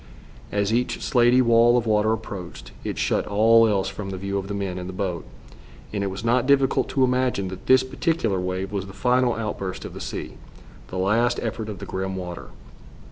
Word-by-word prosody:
As 100 +1 0
each 125 +2 0
slatey 125 +1 +4
wall 120 0 +5
of 120 - 0
water 110 0 +2
approached, 100 -5 -6
it - - -4
shut - - 0
all 115 +2 +5
else 100 -3 +1
from 95 0 -6
the 95 - -4
view 100 +1 -2
of 95 - -6
the 100 - -4
men 95 -2 -3
in 90 - -6
the 95 - -6
boat, 90 -3 -3 0.7
and 100 -1 -1
it - - 0
was 95 +2 -5
not 120 +2 +2
difficult 135 -2 +3
to 135 - +1
imagine 125 -6 +1
that 95 0 -9
this 130 0 +6
particular 130 - -1
wave 95 +2 -3
was 100 -2 -3
the 95 - -10
final 125 +4 +2
outburst 105 -4 -4
of - - -7
the - - -9
ocean, - - -6 0.5
the 95 - -6
last 115 +6 +2
effort 110 -1 -3
of 105 - -6
the - - -7
grim 95 0 -3
water. 90 -2 -6
105 Hz, 205 wpm, -24 LUFS, 95-120 Hz, 0.7 s, this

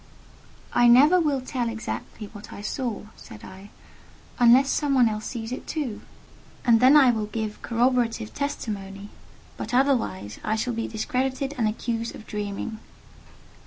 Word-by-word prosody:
"I 240 - +5
never 290 +9 +7
will 290 -5 0
tell 250 -2 -2
exactly 220 -1 -6
what 205 -1 -11
I - - -8
saw," 235 0 -3
said 105 - -13
I, 190 +2 -11 0.7
"unless 245 +3 +6
some 285 -2 +1
one 250 -3 +5
else 215 0 -3
sees 225 -2 -5
it 255 - -6
too, 275 -9 -4 0.6
and 235 -2 +5
then 260 +5 +7
I 265 -4 +6
will 215 -2 -2
give 215 -1 -5
corroborative 235 -2 0
testimony; 205 -8 -5 0.5
but 245 - -4
otherwise, 245 - 0
I 215 - 0
shall 240 +3 -2
be 230 0 -3
discredited 260 +5 -2
and 230 -4 +1
accused 230 +1 -3
of 215 - -11
dreaming." 210 +1 -5
235 Hz, 150 wpm, -25 LUFS, 215-260 Hz, 0.7 s, never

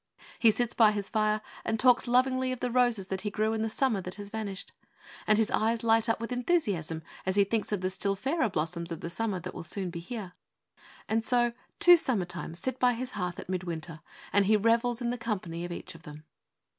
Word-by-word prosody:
He 230 - +6
sits 240 +2 0
by 215 -2 +5
his 200 -1 -4
fire 215 -1 +1 0.2
and 220 0 -1
talks 250 0 +4
lovingly 255 +1 +2
of 255 - -4
the 250 -1 -2
roses 240 -5 +2
that 190 -1 -2
he 210 - -2
grew 215 +2 0
in 220 - -1
the 225 - 0
summer 225 -3 +1
that 180 +1 -6
has 205 -1 -8
vanished, 205 -3 -5 0.6
and 215 - +5
his 220 -1 +1
eyes 225 +1 +1
light 225 0 +3
up 225 - +1
with 230 +2 -5
enthusiasm 205 - 0 0.2
as 190 0 -1
he 200 - +6
thinks 215 +2 -2
of 205 -3 -1
the 185 - 0
still 195 +1 -1
fairer 270 - 0
blossoms 170 0 -2
of 165 - -5
the 170 - -5
summer 210 -1 -2
that 185 - -7
will - - -6
soon 180 +2 -2
be 170 - -6
here. 190 0 -7 0.7
And 225 +1 0
so 240 0 +2 0.2
two 350 0 +8
summer 235 - +1
times 175 -2 -6
sit 260 +5 -3
by 250 -1 +4
his 250 +2 -5
hearth 180 -5 -3
at - - -8
mid 185 0 -2
winter, 165 -2 -6 0.3
and 200 -1 +4
he 215 0 +5
revels 230 +3 +2
in 240 0 0
the 245 - -4
company 185 -7 -3
of 175 - -7
each 175 - -7
of 165 - -14
them. 150 0 -11
215 Hz, 230 wpm, -29 LUFS, 185-240 Hz, 0.7 s, two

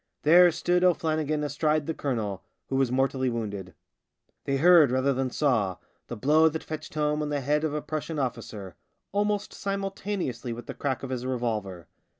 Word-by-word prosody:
There 175 +4 +7
stood 180 +2 +1
O'Flannigan 155 -4 +1
astride 150 +1 0
the 160 - -2
colonel, 110 -10 -3 0.3
who 135 - -1
was 135 -2 +2
mortally 130 0 +1
wounded. 105 -6 -5 0.7
They 135 - 0
heard 165 -1 +7
rather 130 +2 +2
than 130 0 -1
saw 115 - +1 0.3
the - - -6
blow 155 +7 +4
that 160 +1 -5
fetched 155 0 -7
home 150 0 0
on 150 - -2
the 145 -1 -1
head 150 +3 +1
of 155 -2 -1
a 150 - -3
Prussian 155 +1 -4
officer 115 -8 -4 0.2
— - - -53
almost 205 0 -1
simul 195 -1 -3
taneously 135 - -4
with 120 - -9
the - - -6
crack 135 -2 -3
of 135 - -5
his 125 -1 -3
revolver. 110 -9 -3
145 Hz, 180 wpm, -27 LUFS, 125-155 Hz, 0.7 s, There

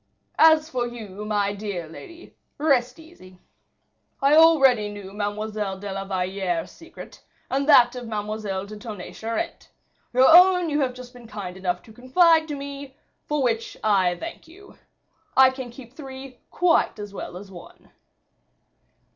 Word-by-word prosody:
As 315 -1 +6
for 250 -5 -2
you, 210 -4 -8
my 205 -1 0
dear 200 -5 -5
lady, 335 - -13 0.2
rest 260 -4 +1
easy. 315 - -16 0.8
I 275 +1 +3
already 270 -9 +5
knew 200 -2 -9
Mademoiselle 205 -1 -3
de 200 0 -6
la 195 0 -5
Valliere's 185 -2 -2
secret, 330 0 -13 0.3
and 275 +2 0
that 245 -3 +6
of 245 -2 -7
Mademoiselle 210 -2 -4
de 210 +1 -10
Tonnay 210 -5 -8
Charente; 230 +10 -5 0.4
your 255 +2 +5
own 360 0 +6
you 295 - +1
have 255 -3 -1
just 250 0 -11
been 245 -2 -14
kind 195 -4 -7
enough 180 -1 -3
to 220 - -16
confide 320 +7 +3
to 295 - -4
me; 280 -1 -8 0.3
for 295 -2 0
which 230 -2 -2
I 190 -4 +2
thank 330 0 -8
you. 390 +5 -16 0.6
I 260 0 +7
can 260 -2 -7
keep 240 0 -13
three 265 -3 -10
quite 350 -8 +2
as 205 -1 -8
well 180 - -7
as 195 +1 -12
one." 175 -2 -14
240 Hz, 155 wpm, -24 LUFS, 205-280 Hz, 0.8 s, I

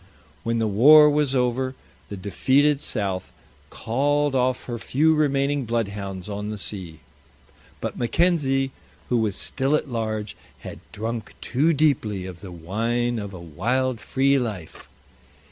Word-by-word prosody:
When 115 0 -1
the 115 - +1
war 150 +9 +7
was 145 -2 +1
over 130 +1 0 0.3
the 100 - -6
defeated 135 +10 +2
South 100 -9 -2 0.4
called 145 +4 0
off 130 0 +1
her 120 -2 -5
few 155 +7 +2
remaining 140 -2 +1
bloodhounds 100 -5 -3
on 105 0 -4
the 105 - -4
sea. 90 -6 -6 0.8
But - - -5
Mackenzie, 135 0 +1 0.4
who 125 - +2
was 110 -4 0
still 135 +2 +1
at 150 - -2
large, 110 -3 -3 0.3
had - - -8
drunk 110 0 -5
too 145 +7 +1
deeply 130 - +1
of 90 -2 -8
the 95 - -9
wine 115 +8 -1
of 100 -2 -6
a 90 - -9
wild, 115 - -1
free 135 +3 +2
life. 105 -10 -6
120 Hz, 140 wpm, -24 LUFS, 105-135 Hz, 0.8 s, war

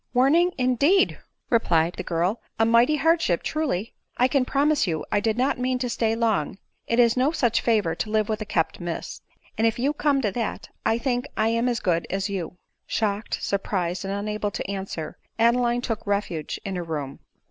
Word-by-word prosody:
" - - -45
Warning, 315 +8 +4
indeed 280 - +3
!" - - -52
replied 175 -8 +3
the - - -5
girl'; 175 +6 -1
" - - -43
a 225 - +5
mighty 235 +6 +4
hard 325 +3 +3
ship, 175 - 0
truly! 255 - -2 0.2
I 250 - +4
can 265 -1 +1
promise 285 -2 +2
you 160 -3 -2
I 205 - +3
did 220 +2 0
not 255 +1 +1
mean 255 0 0
to 250 -1 -2
stay 225 -1 +1
long; 220 -8 0 0.3
it 230 - 0
is 235 -2 +5
no 260 +3 +3
such 240 -8 +1
favor 210 -8 +2
to 215 - -4
live 215 -1 +1
with 215 0 -2
a - - -3
kept 165 -5 -1
miss; 175 -2 -5 0.4
and 225 - +4
if 225 - 0
you 275 +5 +1
come 290 -2 +1
to 210 - +1
that, 230 +2 -4
I 225 +1 +2
think 245 0 -1
I 220 +1 +2
am 230 +2 +1
as 235 -2 -1
good 170 -3 0
as 195 +1 -1
you." 180 -3 -4 0.3
Shocked, 210 0 -1
surprised, 185 -3 -1
and 195 - -3
unable 210 +1 -2
to - - -5
answer, 190 -5 -5 0.2
Adeline 240 +1 +3
took 225 -4 -4
refuge 200 -6 -2
in 195 -2 -3
her 175 - -3
room. 145 -4 -5
225 Hz, 210 wpm, -25 LUFS, 195-250 Hz, 0.4 s, a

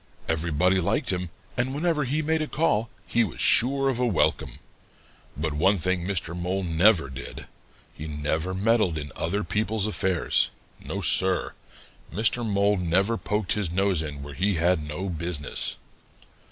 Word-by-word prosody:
Everybody 85 +3 +1
liked 130 - 0
him, 90 -1 -3 0.3
and 130 +2 -1
whenever 155 -2 +1
he 150 +5 -1
made 160 +1 +1
a 155 - -2
call, 115 -10 0 0.2
he 120 - +2
was 105 - -5
sure 135 +3 +4
of 130 -3 0
a 125 - +2
welcome. 100 -8 0 0.8
But 75 0 -2
one 95 +7 +3
thing 90 +1 0
Mr. 85 -3 -2
Mole 90 +2 -2
never 85 -1 +4
did; 65 +1 -7 0.5
he 80 - -7
never 80 +4 -2
meddled 105 -4 +2
in 75 -2 -6
other 100 +6 -1
people's 110 -1 -1
affairs. 95 -5 +1 0.3
No, - - -4
Sir, 95 -1 +2 0.6
Mr. 115 +5 +2
Mole 100 -1 +2
never 95 +5 +1
poked 105 -4 -2
his 100 -5 0
nose 95 -2 +1
in 75 -3 -6
where 70 0 -8
he 95 +5 0
had 85 0 +2
no 75 +6 -5
business. 85 -3 -3
95 Hz, 155 wpm, -26 LUFS, 80-110 Hz, 0.8 s, sure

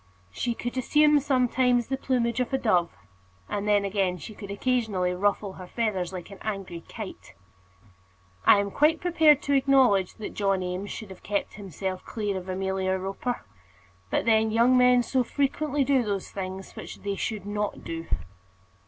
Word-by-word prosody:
She 235 - -2
could 245 +2 -5
assume 300 +3 +4
sometimes 250 -3 +2
the 265 - -2
plumage 245 -3 0
of 250 - -1
a 265 - +2
dove; 180 -9 +2 0.6
but 205 0 -3
then 205 -1 +3
again 195 -2 0
she 180 +7 -9
could 200 -1 -9
occasionally 205 -5 0
ruffle 200 +1 0
her 185 -1 -10
feathers 195 -5 -1
like 185 0 -7
an 195 - -11
angry 195 -5 -5
kite. 205 - -9 1.1
I - - +7
am 200 0 -1
quite 310 +6 +3
prepared 320 -4 +4
to 285 - 0
acknowledge 260 -9 +4
that 215 - -7
John 195 -2 0
Eames 180 +3 -4
should 215 -3 -7
have 190 - -11
kept 200 -1 -2
himself 190 -1 -5
clear 205 -3 -3
of 185 0 -6
Amelia 190 0 -1
Roper; 195 - -4 0.6
but - - 0
then 220 -1 +4
young 235 +3 +4
men 250 -1 +5
so 255 +2 +1
frequently 285 +3 0
do 270 -1 +3
those 200 -4 -3
things 190 0 -6
which - - -9
they 200 0 -2
should 205 -1 -3
not 205 0 -3
do! 165 0 -5
210 Hz, 170 wpm, -27 LUFS, 190-250 Hz, 1.1 s, I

